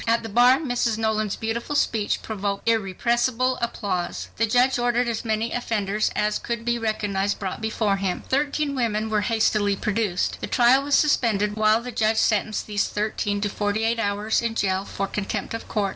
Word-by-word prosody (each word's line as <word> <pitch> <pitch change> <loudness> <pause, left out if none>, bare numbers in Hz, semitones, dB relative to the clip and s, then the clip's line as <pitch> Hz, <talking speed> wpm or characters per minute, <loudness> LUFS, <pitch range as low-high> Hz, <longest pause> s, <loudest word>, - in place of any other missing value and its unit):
At 230 +1 +2
the 225 - -6
bar 245 +4 +5
Mrs. 245 -6 -1
Nolan's 215 -2 0
beautiful 235 +5 -3
speech 220 -7 0
provoked 200 -1 -3
irrepressible 235 +4 +1
applause. 195 -7 -3
The 230 - +2
judge 250 +3 +3
ordered 240 0 +1
as 230 -2 -2
many 220 0 -1
offenders 215 -3 -1
as 210 0 0
could 235 -1 -4
be 240 0 0
recognized 205 -3 -1
brought 190 0 -5
before 220 -2 0
him. 190 -2 -2
Thirteen 285 +1 0
women 220 -4 -1
were 210 -1 +2
hastily 210 -2 +1
produced. 210 -3 -1
The - - -3
trial 250 +2 +4
was 285 0 +1
suspended 210 -8 +2
while 215 +1 +3
the 250 - -6
judge 220 -1 +1
sentenced 215 0 +1
these 205 -1 -1
thirteen 205 -1 -2
to 205 - 0
"forty 205 +2 -1
eight 230 +1 +1
hours 205 +1 0
in 230 -1 -2
jail 190 -2 0
for 195 - -3
contempt 200 +1 -4
of 230 - -6
court." 205 -3 -1
220 Hz, 180 wpm, -24 LUFS, 205-235 Hz, -, bar